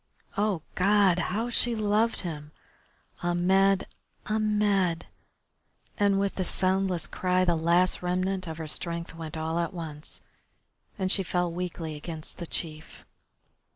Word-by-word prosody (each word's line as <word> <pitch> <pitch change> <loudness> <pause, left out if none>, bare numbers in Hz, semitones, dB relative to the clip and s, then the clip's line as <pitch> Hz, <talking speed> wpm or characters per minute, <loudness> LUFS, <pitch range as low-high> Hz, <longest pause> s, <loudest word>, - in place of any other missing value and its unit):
Oh, 200 -5 0
God! 195 -1 +4
How 220 +7 -1
she 240 0 +4
loved 215 +1 +2
him! 150 -4 -6 0.7
Ahmed! 190 +3 +3 0.4
Ahmed! 210 -5 +1 0.9
And 200 -1 +4
with 200 0 0
the 190 - +1
soundless 185 -2 +1
cry 185 +2 +1
the 175 - +3
last 170 +3 +2
remnant 185 +1 -1
of 160 -1 -5
her 160 - -5
strength 170 +2 -3
went 160 -1 -6
all 160 +1 -1
at 170 +1 -2
once, 155 -3 -6 0.8
and 190 -2 0
she 200 - +3
fell 180 -1 0
weakly 170 -2 -4
against 155 +2 -7
the 170 - -4
chief. 160 -1 -5
180 Hz, 130 wpm, -28 LUFS, 165-195 Hz, 0.9 s, God